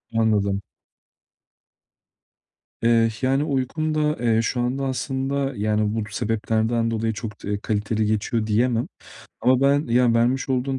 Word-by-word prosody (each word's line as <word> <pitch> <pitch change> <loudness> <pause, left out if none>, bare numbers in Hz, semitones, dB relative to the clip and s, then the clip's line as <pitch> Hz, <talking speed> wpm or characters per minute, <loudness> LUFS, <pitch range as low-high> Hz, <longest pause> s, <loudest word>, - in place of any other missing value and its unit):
Anladım. 100 -3 +1 2.2
Eee, 115 -1 +4
yani 135 +2 +2
uykum 155 +2 -1
da, 150 0 +1
eee, 115 -1 +2
şu 120 +2 -2
anda 135 +3 -1
aslında, 135 +1 -2
yani 105 0 0
bu 115 - -1
sebeplerden 115 +1 0
dolayı 115 0 -1
çok 105 -1 -7
d - - -5
eee, 100 - 0
kaliteli 110 0 -1
geçiyor 110 +1 -1
diyemem 115 +2 +1 0.5
ama 130 +1 +3
ben, 140 +2 +3
ya 120 0 +3
vermiş 125 +4 +1
olduğun 130 +1 -1
115 Hz, 135 wpm, -23 LUFS, 110-135 Hz, 2.2 s, Eee